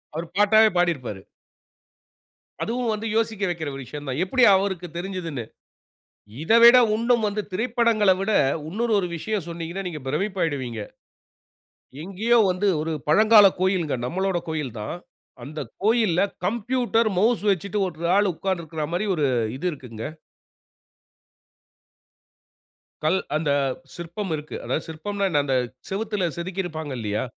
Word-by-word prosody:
அவரு 165 +2 -4
பாட்டாகவே, 215 +1 +6
பாடியிருப்பாரு. 140 - 0 1.4
அதுவும் 235 0 -1
வந்து 215 +1 -4
யோசிக்க 225 -2 0
வைக்குற 160 -4 -3
ஒரு 135 - -7
விஷயம் 145 +4 -8
தான், 130 +3 -2
எப்படி 250 +7 +2
அவருக்குத் 185 -4 -2
தெரிஞ்சிதுனு. 175 -8 -4 1.0
இத 165 - 0
விட 235 +1 +10 0.2
இன்னும் 235 0 +2
வந்து 210 +1 -2
திரைப்படங்கள்ல 225 -2 +2
விட 205 +3 0 0.4
இன்னொரு 225 +7 -1
ஒரு 180 - -3
விஷயம் 200 +1 -3
சொன்னீங்கன்னா, 170 +3 -5
நீங்க 155 -4 -7
பிரமிப்பாகிவிடுவீங்க. 150 - -2 1.2
எங்கேயோ 210 +7 +1
வந்து 185 +3 0
ஒரு 160 +1 -2 0.2
பழங்கால 215 +4 +7
கோயில் 185 -3 +1 0.2
நம்பளோட 190 +5 -1
கோயில்தான். 130 -7 -4 0.5
அந்த 150 +2 -7 0.2
கோயில்ல 215 -6 +3 0.3
கம்ப்யூட்டர் 235 +1 +1
மவுஸ் 225 +4 +2
வச்சிட்டு 200 +3 -3
ஒரு 170 -1 -4
ஆள் 205 -1 +3
உட்கார்ந்து 185 +1 -2
இருக்குற 160 -1 -5
மாரி 185 +5 -1
ஒரு 155 -4 0 0.3
இது 150 - -4
இருக்குங்க. 115 -6 -8 3.0
கல் 170 +5 +2 0.2
அந்த 155 -1 0 0.4
சிற்பம் 175 +3 -5
இருக்கு. 150 0 -7
அதாவது 155 - -2
சிற்பம்ன்னா, 200 +5 -2
என்ன 150 -5 +2
அந்த 135 -2 +1 0.3
சுவர்ற்றில் 205 -2 -1
செதுக்கியிருப்பாங்க 170 -4 -4
இல்லயா. 105 -1 -2
185 Hz, 125 wpm, -24 LUFS, 155-215 Hz, 3.0 s, விட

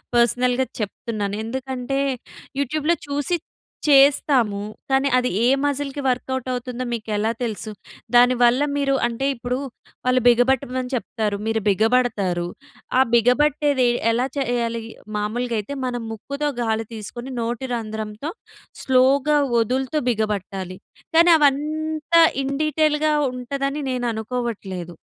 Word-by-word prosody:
పర్సనల్‌గా 245 +2 +3 0.2
చెప్తున్నాను. 205 -1 -3
ఎందుకంటే 260 +2 -3 0.6
యూట్యూబ్‌లో 305 +4 +1
చూసి 290 +5 -1 0.5
చేస్తాము. 270 -6 +4 0.3
కానీ 270 +1 +3
అది 250 0 +1 0.2
ఏ - - +5 0.2
మసిల్‌కి 285 0 -2
వ‌ర్కౌట్ 260 0 -1
అవుతుందో, 250 0 -4
మీకు 225 -1 -5
ఎలా 220 +2 +1
తెలుసు? 220 -1 -4 0.4
దాని 245 +1 +6
వల్ల 245 +2 +5 0.2
మీరు 275 -1 +1
అంటే 240 +3 -3
ఇప్పుడు 245 +1 -3 0.5
వాళ్ళు 255 0 +3
బిగ 240 0 +6
బట్టమని 255 -1 -1
చెప్తారు, 215 -3 -2
మీరు 225 0 +1
బిగబడతారు. 205 -4 +2 0.5
ఆహ్, 265 - +4
బిగబట్టేది 260 +2 +3 0.2
ఎలా 240 +3 +1
చేయాలి? 235 -3 -1 0.4
మామూలుగా 230 +3 -2
అయితే 210 +7 -5
మనం 245 -1 -2
ముక్కుతో 280 +7 -3
గాలి 225 -1 0
తీసుకొని 240 +4 -7
నోటి 240 +3 -3
రంధ్రంతో 220 +4 -5 0.5
స్లోగా 265 +3 +3 0.2
వదులుతూ 260 +6 0
బిగబట్టాలి. 195 -4 -2 0.4
కానీ 340 +1 +7
అవంతా 310 +3 +2 0.2
ఇన్‌డీటెయిల్‌గా 305 +2 +1 0.2
ఉంటదని 275 +3 -3
నేను 245 -1 -1
అనుకోవట్లేదు. 215 -7 -4
250 Hz, 110 wpm, -22 LUFS, 225-275 Hz, 0.6 s, కానీ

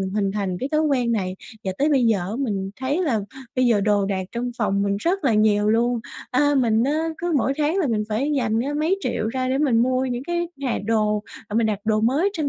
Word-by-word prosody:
mình 190 0 -3
hình 200 -2 0
thành 195 -3 -2
cái 265 - -2
thói 305 - +3
quen 255 -6 +1
này 185 -3 -2 0.3
và 190 - -1
tới 290 - +3
bây 270 -5 +3
giờ 220 -3 +3
á 180 +3 -4
mình 200 -8 -2
thấy 285 +8 0
là 235 -10 +1 0.4
bây 255 - +3
giờ 225 -4 +3
đồ 205 -1 +2
đạc 190 -2 -2
trong 245 +1 -2
phòng 200 -2 +1
mình 200 0 0
rất 350 - 0
là 235 -5 +3
nhiều 210 -1 +3
luôn. 235 +1 +2 0.3
A, 290 +3 +3
mình 230 -3 +3
á, 310 +4 0
cứ 345 0 -2
mỗi 270 - +1
tháng 310 +6 +1
là 340 - +2
mình 220 -3 0
phải 260 +8 0
dành 225 -3 +1
ra 280 +5 -1
mấy 365 +5 +1
triệu 220 - -1
ra 255 +1 -2
để 265 +1 +1
mình 250 -6 +3
mua 255 +1 +1
những 245 -1 -3
cái 345 0 -2
hà 255 - 0
đồ, 215 -2 +1 0.3
à, 210 - -6
mình 230 0 +3
đặt 210 -2 -1
đồ 215 -1 +2
mới 280 - +2
trên 310 -7 -1
240 Hz, 255 wpm, -23 LUFS, 210-285 Hz, 0.4 s, thói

